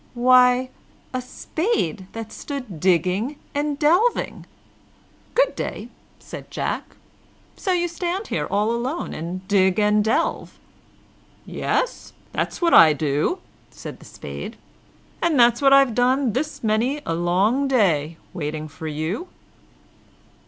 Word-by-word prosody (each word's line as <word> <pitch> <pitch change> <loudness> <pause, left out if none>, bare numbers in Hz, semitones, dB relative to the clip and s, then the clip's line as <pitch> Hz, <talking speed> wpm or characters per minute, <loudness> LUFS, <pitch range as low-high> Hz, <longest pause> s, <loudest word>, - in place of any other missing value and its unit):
Why, 250 +1 +5 0.4
a 255 - -1
spade 250 - -2
that 225 -1 -7
stood 280 +1 -6
there 175 -6 -9
digging 185 - +1 0.2
and 290 0 -1
delving. 350 +11 +1 0.9
"Good - - +3
day!" - - -5 0.3
said - - -10
Jack. - - -4 0.6
"So 380 - -2
you 350 -1 +1
stand 350 +4 -3
here - - -1
all 210 +2 +1
alone, 250 +8 -3
and 180 +4 -6
dig 190 -2 +3
and 210 0 +3
delve!" 220 - -1 0.9
"Yes, - - -2 0.2
that's - - -2
what 335 - +3
I 160 -2 +8
do," 150 - -1 0.3
said - - -9
the - - -15
Spade, - - -8 0.6
"and 330 -5 +2
that's 235 +1 +5
what 275 -1 +5
I've 275 -3 +6
done 250 0 +2
this 295 +3 -3
many 235 +7 0
a - - -1
long 190 +11 +1
day, 170 - +2 0.2
waiting 155 -1 -4
for 160 +1 -8
you." 160 - -3
235 Hz, 130 wpm, -22 LUFS, 180-285 Hz, 0.9 s, I